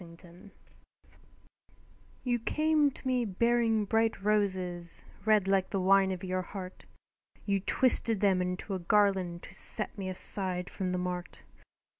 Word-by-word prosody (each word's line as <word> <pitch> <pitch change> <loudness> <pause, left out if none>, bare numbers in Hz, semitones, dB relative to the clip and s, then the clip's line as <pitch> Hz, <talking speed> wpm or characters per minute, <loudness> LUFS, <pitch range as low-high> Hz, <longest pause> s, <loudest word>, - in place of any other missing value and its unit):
Crowned 175 +4 -15 1.7
You 245 -2 0
came 305 +4 +2
to 265 - -9
me 250 -1 +1
bearing 225 +1 +1
bright 225 +1 +1
roses, 185 -5 -1 0.2
Red 215 -3 +3
like 195 -1 +2
the 195 - -1
wine 190 +1 +4
of 185 -1 -5
your 185 0 -1
heart; 185 0 -9 0.6
You 200 -1 +1
twisted 230 +1 +3
them 190 -2 +3
into 180 +2 -3
a 190 - -2
garland 185 -2 +1
To - - -11
set 215 - -5
me 190 -1 -3
aside 185 -1 -4
from 185 -2 -3
the 180 - -1
mart. 180 -1 -5
195 Hz, 140 wpm, -30 LUFS, 185-220 Hz, 1.7 s, wine